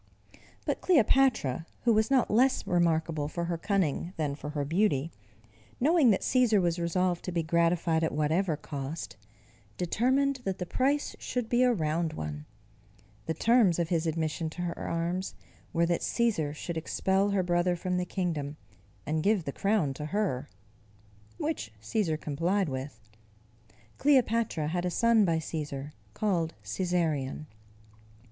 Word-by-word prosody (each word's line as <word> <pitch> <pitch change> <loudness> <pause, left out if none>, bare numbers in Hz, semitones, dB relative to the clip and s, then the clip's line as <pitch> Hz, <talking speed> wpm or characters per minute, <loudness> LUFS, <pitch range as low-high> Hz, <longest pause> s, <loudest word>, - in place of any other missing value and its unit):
But - - -1
Cleopatra, 250 - +3 0.2
who 235 - +4
was 220 +2 +2
not 265 -3 +3
less 255 +5 +3
remarkable 160 -4 +1
for 170 +3 -3
her 170 0 -1
cunning 180 -3 0
than 150 -3 -1
for 145 +1 -7
her 145 -1 -2
beauty, 165 -2 +1 0.7
knowing 300 0 +4
that 200 - +3
Cæsar 245 -5 +3
was 175 -1 0
resolved 175 +1 0
to 180 - -3
be 170 -1 0
gratified 170 0 +2
at 160 - +1
whatever 155 +2 +1
cost, 145 +1 -6 0.6
determined 260 +9 +1
that 195 -3 -2
the 180 - -4
price 275 +9 0
should 245 -3 -3
be 240 +1 +3
a 250 -1 +5
round 160 -4 0
one: 75 - -6 0.8
the 160 - -1
terms 225 -2 +4
of 170 -2 -1
his 165 -2 0
admission 160 0 -1
to 175 +3 -6
her 170 -1 -2
arms, 170 +3 -3 0.4
were 170 0 +2
that 170 0 0
Cæsar 210 -11 0
should 170 +2 -5
expel 190 +4 +1
her 200 -2 +1
brother 175 0 +1
from 180 +1 -2
the 180 - 0
kingdom, 155 -7 -3 0.5
and 155 +1 0
give 200 0 +2
the 140 - -4
crown 195 -9 +1
to 150 +3 -6
her; 155 -8 -1 0.9
which 110 -1 -3
Cæsar 160 - -1
complied 170 +5 0
with. 130 +1 -5 1.0
Cleopatra 230 - +2
had 175 +2 -1
a 180 - 0
son 230 +2 +4
by 165 -2 +2
Cæsar 150 -3 -5 0.2
called 175 -6 0
Cæsarion. 160 -6 -1
175 Hz, 150 wpm, -29 LUFS, 155-205 Hz, 1.0 s, a